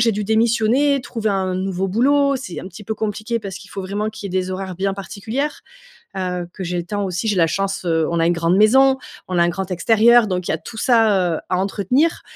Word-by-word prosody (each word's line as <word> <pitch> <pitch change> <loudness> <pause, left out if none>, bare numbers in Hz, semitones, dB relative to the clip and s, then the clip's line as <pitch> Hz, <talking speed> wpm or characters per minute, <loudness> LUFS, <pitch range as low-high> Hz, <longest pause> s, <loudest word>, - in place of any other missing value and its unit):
j'ai 230 - +3
dû 210 +1 -2
démissionner, 230 +6 +2
trouver 225 -3 -3
un 190 -2 -1
nouveau 190 0 -2
boulot, 280 +7 +3
c'est 245 -9 -7
un - - -8
petit 195 +3 -12
peu 220 - -3
compliqué 215 +2 -3
parce 195 -3 -6
qu'il 195 -1 -13
faut 195 - -5
vraiment 205 +3 -3
qu'il 210 -3 -8
y - - -1
ait - - +3
des 185 0 -5
horaires 190 0 -5
bien 195 +1 -1
particulières, 220 +9 -4 0.6
heu, 180 -2 -3
que 190 - -6
j'ai 180 0 -3
le 175 - -2
temps 205 +2 -2
aussi 185 +3 -3
j'ai 210 - +1
la 170 -3 +4
chance 195 +2 -2
heu 160 -2 +1
on 170 - -1
a 165 - +3
une 175 - +3
grande 170 +2 +2
maison, 265 +6 +5 0.3
on 185 - -2
a 170 - +5
un 170 - +2
grand 190 +2 -4
extérieur. 225 +5 +4
Donc 180 -2 -2
il - - 0
y - - 0
a - - 0
tout 225 - -11
ça, 210 -8 +3
heu, - - -4
à 180 - +1
entretenir. 205 - 0
195 Hz, 255 wpm, -20 LUFS, 185-225 Hz, 0.6 s, maison